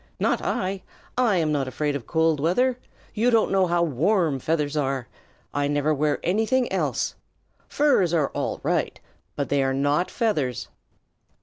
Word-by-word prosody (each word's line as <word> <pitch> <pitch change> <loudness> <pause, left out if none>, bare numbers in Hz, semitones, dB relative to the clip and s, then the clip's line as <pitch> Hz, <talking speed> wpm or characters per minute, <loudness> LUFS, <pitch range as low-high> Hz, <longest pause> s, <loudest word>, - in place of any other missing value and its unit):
"Not - - +1
I! 190 +1 -2 0.3
I'm 190 -11 +2
not 140 -3 0
afraid 145 +2 -2
of 135 -5 -6
cold 160 -2 +2
weather. 245 - +1 0.3
You 230 +3 +2
don't 230 -2 +3
know 190 -1 +3
how 170 0 +2
warm 165 - +1
feathers 150 +1 -1
are. 135 -4 -1 0.5
I 145 0 0
never 145 +1 +1
wear 150 0 +1
anything 225 +7 +1
else. - - -1 0.5
Furs 275 - +2
are 155 -5 +1
all - - -3
right, - - -1 0.4
but 140 - -3
they 140 -1 +2
are 135 0 0
not 145 +6 +1
feathers." 150 - -1
160 Hz, 150 wpm, -24 LUFS, 145-195 Hz, 0.5 s, don't